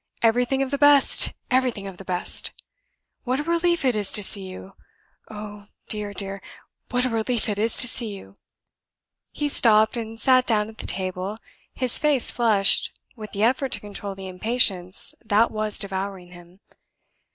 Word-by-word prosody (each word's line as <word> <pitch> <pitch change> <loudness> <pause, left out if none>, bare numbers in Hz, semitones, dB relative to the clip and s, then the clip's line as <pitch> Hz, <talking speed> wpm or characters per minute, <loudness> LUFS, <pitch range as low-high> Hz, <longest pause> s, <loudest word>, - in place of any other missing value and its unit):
Everything 245 +4 +2
of 270 - -6
the 280 - -2
best! 290 -1 +5 0.2
everything 250 -6 0
of 195 -2 -9
the 195 - -10
best! 180 -1 0 0.7
What 255 +1 -2
a - - -2
relief 340 -1 0
it 250 -3 +2
is 205 -2 -2
to 210 - +3
see 190 -1 +1
you! 190 +1 -11 0.6
Oh, 210 -1 -10 0.2
dear, 210 -1 -2
dear, 195 -1 -4 0.5
what 250 0 0
a - - 0
relief 225 +1 -1
it 205 -1 -3
is 225 +1 0
to 250 - +9
see 240 -1 +1
you." 195 - -13 1.0
He 295 - -3
stopped 220 -5 +3
and 225 -1 -6
sat 255 0 +3
down 210 -2 +1
at 220 - -15
the - - -6
table, 185 +2 -3 0.4
his 255 -2 +1
face 295 -5 +2
flushed 215 -4 +3 0.2
with 215 -3 -10
the 200 - -2
effort 260 +3 +1
to - - +2
control 200 -1 -8
the 190 0 -9
impatience 185 -2 0
that 220 +1 +2
was 215 -1 -2
devouring 190 -2 -5
him. 175 +2 -16
215 Hz, 170 wpm, -23 LUFS, 195-250 Hz, 1.0 s, to